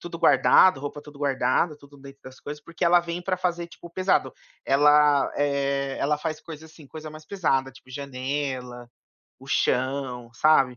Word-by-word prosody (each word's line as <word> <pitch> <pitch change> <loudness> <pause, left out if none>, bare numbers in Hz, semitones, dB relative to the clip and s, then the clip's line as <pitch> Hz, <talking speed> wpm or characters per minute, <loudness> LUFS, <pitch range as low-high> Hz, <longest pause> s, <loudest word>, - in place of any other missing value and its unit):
tudo 170 -1 -7
guardado, 185 -5 +5
roupa 145 +1 -6
tudo 145 -1 -14
guardada, 140 +3 +1
tudo 145 0 -17
dentro 135 0 -13
das 130 0 -12
coisas, 150 0 -8
porque 170 - -9
ela 175 +1 +6
vem 170 0 -5
pra 185 0 -1
fazer, 175 -1 -2
tipo, 170 - -13
o - - -12
pesado. 185 +2 +1 0.3
Ela, 145 0 +4
eh, 140 -1 -1
ela 150 +2 +1
faz 155 -1 -4
coisa, 160 -1 -10
assim, 155 -2 -16
coisa 155 +2 -9
mais 155 0 -12
pesada, 135 -9 0
tipo, 130 0 -19
janela, 130 -2 -5 0.5
o - - -14
chão, 125 -2 -1
sabe, 135 -5 +3
145 Hz, 175 wpm, -25 LUFS, 135-160 Hz, 0.5 s, ela